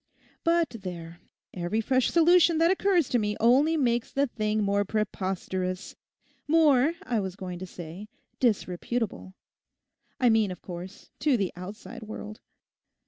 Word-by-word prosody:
But 335 -7 +1
there, 170 -2 -7 0.3
every 180 +4 -2
fresh 255 +3 +2
solution 340 0 +5
that 330 +2 +4
occurs 380 -6 +2
to 245 - +2
me 210 -1 -1
only 275 +8 +4
makes 240 -4 0
the 280 +1 +2
thing 215 -4 -1
more 200 0 +2
preposterous, 190 -2 -3 0.5
more, 300 -2 +4
I 235 -3 -1
was 190 -2 -4
going 180 -2 -6
to 185 - -6
say, 175 +3 -9 0.3
disreputable—I 225 +3 -3
mean, 220 -2 +3
of 180 - -8
course, 180 +1 -9
to 270 0 +3
the 195 -4 -1
outside 205 +6 -9
world. 215 0 -8
215 Hz, 135 wpm, -27 LUFS, 185-270 Hz, 0.5 s, solution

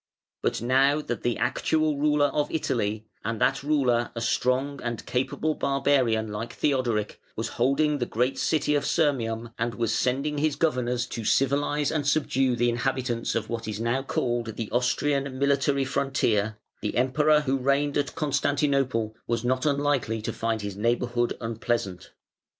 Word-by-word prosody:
But - - -1
now 135 +4 +3
that 120 -6 -4
the 120 -1 0
actual 155 -1 +1
ruler 150 -1 +3
of 150 -1 0
Italy, 110 -8 -1 0.2
and 115 +1 -2
that 135 - +2
ruler 130 -5 +1
a 115 - -3
strong 130 +4 0
and 120 -2 -4
capable 135 +5 -1
barbarian 130 -7 +1
like 105 +3 -5
Theodoric, 120 -7 0
was 115 - -3
holding 145 +4 +1
the 120 - -1
great 125 +4 0
city 150 -2 +1
of 145 - +1
Sirmium, 115 -7 0
and 120 -1 -1
was 115 -1 0
sending 140 +5 0
his 150 -1 +1
governors 125 -6 0
to 115 -2 -6
civilise 145 +4 +1
and 150 -3 -1
subdue 135 -3 +2
the 120 0 +2
inhabitants 125 -1 -1
of 115 -1 -1
what 115 -1 -4
is 105 -1 -4
now 120 +3 0
called 120 -4 -2
the 110 -2 -5
"Austrian 135 +2 0
Military 140 0 +2
Frontier", 110 -6 0 0.2
the 105 - -2
Emperor 150 +4 +3
who 135 -2 0
reigned 140 +2 +1
at 140 -2 -1
Constantinople 140 -6 0
was 120 0 -1
not 130 +4 +1
unlikely 140 -6 +1
to - - -3
find 115 -2 -2
his 100 -2 -4
neighbourhood 120 +2 0
unpleasant. 115 -5 -3
130 Hz, 155 wpm, -26 LUFS, 115-140 Hz, 0.2 s, now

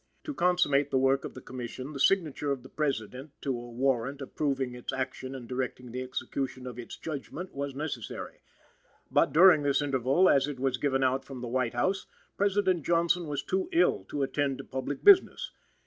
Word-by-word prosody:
To 300 - -4
consummate 175 - +2
the 135 - +1
work 135 +1 +2
of - - -8
the 130 - -8
Commission, 130 +3 -7
the 140 - -6
signature 155 -4 +2
of 135 -3 -3
the 130 - -12
President 135 -1 -3
to 140 - -1
a 120 0 -7
warrant 130 +2 0
approving 135 -2 -2
its 125 0 -5
action 130 0 -4
and 125 -3 -8
directing 125 -1 -4
the 125 +2 -4
execution 130 0 -4
of 125 -1 -7
its 120 - -8
judgment 160 +4 -6
was 140 -1 -4
necessary. 140 -6 -5 0.7
But, - - +3
during 165 +1 +7
this 140 -1 +2
interval, 140 +4 +2
as 135 -3 +4
it 145 -3 -5
was 130 -1 0
given 135 -1 +1
out 130 +1 +1
from 135 -2 -9
the 125 - -4
White 120 -1 -1
House, 190 +11 0 0.3
President 195 -4 +1
Johnson 170 +1 +2
was 145 -2 -3
too 190 0 -1
ill 175 - +3
to 140 +7 -2
attend 135 0 0
to - - -7
public 130 +2 -5
business. 400 -2 +5
135 Hz, 190 wpm, -29 LUFS, 130-150 Hz, 0.7 s, during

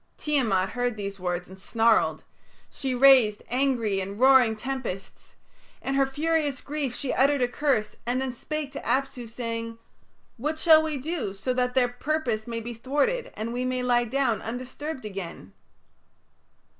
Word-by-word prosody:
Tiamat 225 -11 +1
heard 245 -2 -2
these 200 -1 -5
words 180 -1 -2
and 190 +1 -12
snarled. 225 +3 +2 0.5
She 265 -2 -3
raised 250 -5 +6
angry 245 -6 +1
and 195 +2 -5
roaring 255 -3 +6
tempests; 235 -5 -6 0.4
in 270 - -3
her 275 0 +3
furious 295 -1 0
grief 285 -4 -3
she 275 - -2
uttered 275 0 +3
a - - +3
curse, 245 -5 0
and 245 +2 0
then 265 -1 -2
spake 295 +4 -4
to - - -6
Apsu, 265 -3 -1
saying, 230 -1 -4 0.6
"What 300 +6 -2
shall 315 -1 +7
we 315 -2 -2
do 275 - -3
so 195 +6 -2
that 250 0 0
their 255 -2 +4
purpose 245 -4 -2
may 230 -1 -3
be 240 +2 -6
thwarted 290 - -1
and 225 +2 -4
we 250 +1 -2
may 255 0 -1
lie 240 -1 +3
down 240 -3 0
undisturbed 255 +3 -6
again?" 185 - -7
250 Hz, 155 wpm, -26 LUFS, 225-275 Hz, 0.6 s, shall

